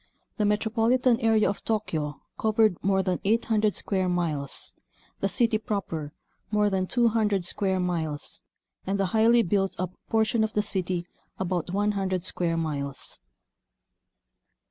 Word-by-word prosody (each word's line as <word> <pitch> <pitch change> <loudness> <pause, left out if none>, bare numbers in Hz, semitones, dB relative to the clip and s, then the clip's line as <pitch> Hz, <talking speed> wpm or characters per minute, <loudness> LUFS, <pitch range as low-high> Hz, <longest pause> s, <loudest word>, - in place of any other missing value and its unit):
The 210 - +1
metropolitan 230 +4 +2
area 225 -3 +3
of 200 - -3
Tokyo 160 -10 -2
covered 220 -2 +3
more 190 0 +2
than 185 -2 0
800 215 0 +2
square 190 -2 -1
miles; 155 -6 -2 0.5
the 195 - 0
city 225 0 +2
proper, 170 -9 -3 0.4
more 210 -1 +2
than 185 -1 0
200 220 -5 +2
square 190 +1 0
miles; 165 -5 -2 0.4
and 195 +1 -1
the 195 - +2
highly 230 +2 +5
built 195 0 0
up 185 0 -2 0.2
portion 220 0 +2
of 220 - -1
the 210 - +1
city, 185 -4 -1 0.3
about 180 -2 -1
100 195 -2 0
square 170 -2 0
miles. 140 -4 -3
195 Hz, 130 wpm, -27 LUFS, 180-220 Hz, 0.5 s, highly